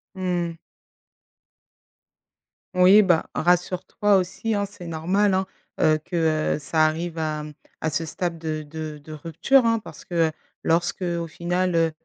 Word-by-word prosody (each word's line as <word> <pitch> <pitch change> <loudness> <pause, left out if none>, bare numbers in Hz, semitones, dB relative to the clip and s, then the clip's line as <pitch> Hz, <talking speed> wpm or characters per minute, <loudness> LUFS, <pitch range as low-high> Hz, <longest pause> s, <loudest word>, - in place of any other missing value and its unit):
Mmh. 175 -2 -1 2.2
Oui, 190 +4 +7
bah, 175 -4 +2
rassure-toi 180 +4 +2
aussi, 195 +4 -1
hein, 200 0 0
c'est 195 -3 -11
normal, 185 +5 +1
hein, 190 0 +1 0.3
heu, 155 0 +4
que, 160 -3 +1
heu - - -5
ça 155 +2 +2
arrive 165 +1 -3
à, 155 -1 -2
hem, 150 0 -8 0.3
à 160 - -1
ce 165 +2 -1
stade 165 +1 -3
de 155 -1 -3
de 155 0 -6
de 150 +2 -13
rupture, 165 - +2
hein, 230 0 +3
parce 215 - -11
que, 175 - -7
heu, - - -7 0.3
lorsqu'au 170 0 0
final 175 +2 -1
heu 165 -1 +3
170 Hz, 150 wpm, -24 LUFS, 160-185 Hz, 2.2 s, Oui